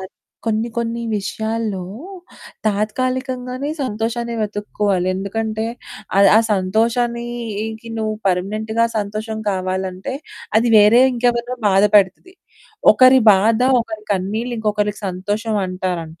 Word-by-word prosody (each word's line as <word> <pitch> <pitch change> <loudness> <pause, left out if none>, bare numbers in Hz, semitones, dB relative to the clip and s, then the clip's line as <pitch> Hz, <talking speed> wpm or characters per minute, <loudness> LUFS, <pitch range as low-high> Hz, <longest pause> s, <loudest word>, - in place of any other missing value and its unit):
తత్ 190 0 -8 0.3
కొన్ని 225 +1 0
కొన్ని 235 0 -2
విషయాల్లో 220 -1 -3 0.8
తాత్కాలికంగానే 255 +5 -2
సంతోషాన్ని 235 0 -2
వెతుక్కోవాలి. 205 -3 -1
ఎందుకంటే 220 +3 -3 0.5
ఆహ్, 200 0 +7
ఆ - - +8
సంతోషానికి 230 +2 -1
నువ్వు 215 0 -1
పర్మనెంట్‌గా 215 +5 0
సంతోషం 215 +2 -4
కావాలంటే 185 +4 -3 0.4
అది 235 +2 +1
వేరే 210 +3 +7
ఇంకెవరినో 245 +1 0
బాధపడతది, 200 - +3 0.6
ఒకరి 255 0 +6
బాధ 220 +4 +2 0.2
ఒకరి 220 -2 -6
కన్నీళ్లు 215 +6 -2
ఇంకొకరికి 210 -1 -1
సంతోషం 205 +4 -2
అంటారంట. 180 -3 -4
220 Hz, 95 wpm, -19 LUFS, 200-235 Hz, 0.8 s, ఆ